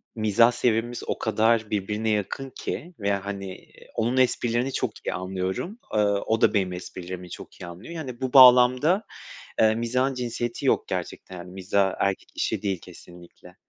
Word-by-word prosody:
mizah 110 +2 +4
seviyemiz 120 0 0
o - - -1
kadar 110 0 +2
birbirine 105 +2 -1
yakın 105 +6 -2
ki 175 +4 -5
ve, 100 -1 0
hani, 100 0 -4
iii, - - -19
onun 120 +3 0
esprilerini 125 0 +1
çok - - -3
iyi - - 0
anlıyorum. 95 - -4
Iıı, 100 -1 +2
o 110 0 0
da - - +4
benim 95 -3 +1
esprilerimi 90 0 -7
çok - - -11
iyi - - -6
anlıyor. 90 - -9
Yani, 135 -7 -7
bu 130 -1 -2
bağlamda, 130 - +7 0.6
eee, 110 0 +5
mizahın 125 +4 0
cinsiyeti 120 -1 -3
yok - - +2
gerçekten. 95 - -5
Hani, 90 +1 -9
mizah 95 +1 0
erkek 100 -1 -1
işi - - -1
değil 95 -3 -1
kesinlikle. 90 0 -14
110 Hz, 160 wpm, -25 LUFS, 95-125 Hz, 0.6 s, bağlamda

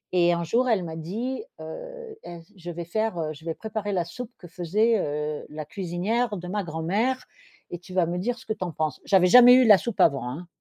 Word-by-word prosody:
et 175 -1 +5
un 170 0 0
jour 240 +10 +1
elle 210 -6 +2
m'a 160 -2 -6
dit 225 - -4 0.2
heu: - - -8
«Ains 170 -1 -8
je 175 -2 -9
vais 170 0 -6
faire, 215 +1 -1
heu, 155 -1 -2
je 155 +2 -15
vais 165 - -3
préparer 215 -1 -4
la 175 -3 0
soupe 225 +8 -8
que 175 - -12
faisait, 200 +6 +1
heu, 150 0 -3
la 155 0 -6
cuisinière 205 +6 -2
de 180 0 -7
ma 200 +2 -2
grand-mère 195 +11 -1 0.5
et 175 - -5
tu 180 +1 -13
vas 180 -2 +3
me 175 +1 -2
dire 240 +6 -2
ce - - -15
que 220 - -1
tu 185 - -5
en 175 - -3
penses». 155 -2 -2
J'avais 190 -2 +4
jamais 245 +4 +9
eu 255 0 +6
la 210 -4 +8
soupe 235 +3 -5
avant, 135 -5 +3
hein. 165 +8 -7
180 Hz, 240 wpm, -25 LUFS, 165-225 Hz, 0.5 s, jamais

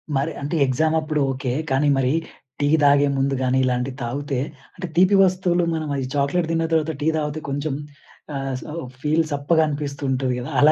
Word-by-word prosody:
మరి 140 +4 0
అంటే 145 +4 -2
ఎగ్జామ్ 155 +5 +1
అప్పుడు 155 -1 -1
ఓకే. 130 -1 -3 0.2
కానీ 140 +2 +2
మరీ 130 0 +2 0.5
టీ 145 - +3 0.2
తాగే 145 0 +5
ముందు 135 +1 +1
గాని 130 0 +2
ఇలాంటివి 125 +1 -1
తాగుతే 140 +2 -2 0.4
అంటే 180 -1 -5
తీపి 185 +3 +5
వస్తువులు 180 -1 +2
మనం 155 -2 -3
అది 135 -2 -2
చాక్లెట్ 150 +4 +1
తిన్న 165 0 +1
తర్వాత 160 0 +1
టీ 155 - 0
తాగితే 150 0 -2
కొంచెం 145 +1 -2 0.6
ఆహ్, 135 -1 -3
స - - -9 0.4
ఫీల్ 155 +2 +2
సప్పగా 145 +3 +2
అనిపిస్తూ 145 -1 -4
ఉంటది 130 -1 0
కదా. 125 - -6
అలా 155 +1 +7
145 Hz, 180 wpm, -22 LUFS, 135-160 Hz, 0.6 s, అలా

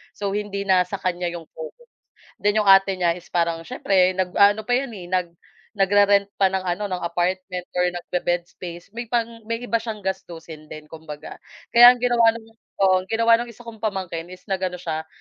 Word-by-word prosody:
So 200 -1 -3
hindi 200 -1 -3
na 185 -1 +4
sa 200 - -4
kanya 180 -1 -2
'yong 170 -1 -7
focus, 485 0 -10 0.6
then 205 +1 +2
'yong 210 - +1
ate 195 0 +6
niya 170 -2 +2
is 175 0 -13
parang 170 -1 0
siyempre 185 +2 +2
nag-aano 200 +3 +3
pa 245 - -1
'yon, 265 +1 0
eh, 185 -4 -9
nag 180 -2 0 0.5
nagre-rent 200 +1 +4
pa 195 -1 +2
ng 190 0 -3
ano 185 +3 -2
ng 185 - -2
apartment 180 +2 -2 0.2
or 180 - +3
nagbe-bed 175 0 -2
space, 175 0 -10
may 235 +3 -6
pang 230 -1 -3
may 230 +1 -3
iba 235 -1 0
siyang 220 -2 -7
gastusin 170 -5 -6
din 155 0 -11
kumbaga. 155 -1 -9 0.3
Kaya 240 +1 +9
ang 245 - -12
ginawa 235 -2 +4
ng 230 - -9 0.4
oo 190 -1 +5
ang 185 - -7
ginawa 230 +2 +3
ng 240 - -4
isa 235 0 -13
kong 230 -2 -10
pamangkin 190 -6 -4
is 185 +1 -12
nag-ano 185 -1 -1
siya, 160 -3 -4
190 Hz, 195 wpm, -23 LUFS, 175-220 Hz, 0.6 s, Kaya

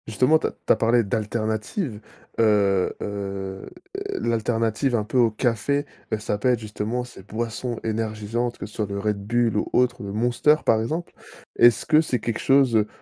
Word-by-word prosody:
Justement 125 +8 +3
tu - - -1
as - - -4
tu - - +1
as - - +1
parlé 115 +1 +3
d'alternative, 110 - -2 0.4
heu 100 -4 +3
heu, 95 -1 -5 0.5
l'alternative 115 +2 0
un 110 - +1
peu 120 +4 0
au 120 -2 +5
café, 120 +5 0 0.2
bah, 110 - 0
ça 105 -1 -3
peut 125 - +2
être 125 - +3
justement 110 +3 -3
ces 125 -5 -12
boissons 115 +3 -4
énergisantes, 110 +2 -2
que - - -6
ce 105 - -12
soit 105 - -2
le 100 0 -4
Red 100 0 -2
Bull 120 -1 +1
ou - - -1
autre, 125 0 +2
ou - - -6
le - - -5
Monster, 120 +7 +3
par 110 -1 +4
exemple. 160 +9 -3 0.4
Est-ce 120 -1 +5
que 155 0 +5
c'est 130 -6 -1
quelque 115 -1 -3
chose, 135 -3 +4
heu 105 -1 +2
115 Hz, 190 wpm, -24 LUFS, 105-120 Hz, 0.5 s, au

